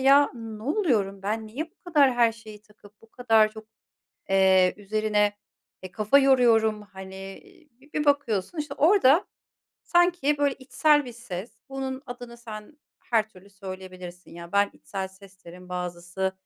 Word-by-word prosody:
"Ya, 275 +2 +6
ne 225 -2 -8
oluyorum 225 - 0
ben, 220 +2 -2
niye 290 +10 -6
bu - - -42
kadar 290 -7 +4
her 235 -1 +4
şeyi 215 -2 -13
takıp, 210 -1 -21
bu 225 - -20
kadar 225 -3 +3
çok, 220 0 -11 0.6
eee, 190 -1 +4
üzerine, 210 0 0 0.5
eee, 185 - -8
kafa 215 +7 +3
yoruyorum." 230 -5 +4
Hani, 190 0 -10 0.5
bir 300 - -1
bakıyorsun, 280 - +1
işte, 295 -2 -3
orada 320 0 +4 0.6
sanki, 345 -4 +2
böyle, 285 -2 +2
içsel 295 +2 +2
bir 245 - -8
ses. 230 -3 -7 0.2
Bunun 270 -1 -5
adını 245 -1 -9
sen 230 +4 -10 0.2
her 220 -2 0
türlü 200 -1 -18
söyleyebilirsin, 185 -2 -9
ya. 170 0 -10
Ben 200 0 +3
içsel 190 -1 -6
ses 190 0 -18
derim, 180 +1 -12
bazısı, 180 +1 -3
215 Hz, 145 wpm, -26 LUFS, 195-265 Hz, 0.6 s, Ya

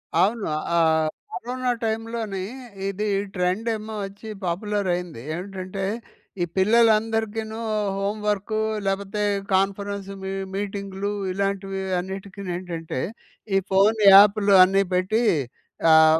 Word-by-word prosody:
అవును. 215 +2 +2 0.3
ఆ - - +5 0.5
కరోనా 250 +6 -2
టైమ్‌లోని 220 -3 -2 0.4
ఇది 205 +2 -2 0.3
ట్రెండ్ 180 +6 0
ఏమో 215 0 -7
వచ్చి 200 +3 -10
పాపులరైంది. 180 - -2
ఏంటంటే 190 +1 -5 0.6
ఈ - - +2
పిల్లలందరికీను 220 +1 +2 0.4
హోమ్ 200 +2 -2
వర్కు 210 +1 0 0.3
లేకపోతే 195 +1 -1 0.3
కాన్ఫరెన్సు 195 +1 -1
మీ 190 - -3 0.2
మీటింగ్‌లు 200 0 -3 0.2
ఇలాంటివి 195 0 -2 0.2
అన్నిటికినేంటంటే, 180 -5 -5 0.6
ఈ - - +6
ఫోన్ 205 +3 +4
యాప్‌లు 205 0 +7
అన్ని 195 +1 +3
పెట్టి 195 +6 +1 0.7
ఆహ్, 160 0 +7
200 Hz, 95 wpm, -24 LUFS, 190-215 Hz, 0.7 s, యాప్‌లు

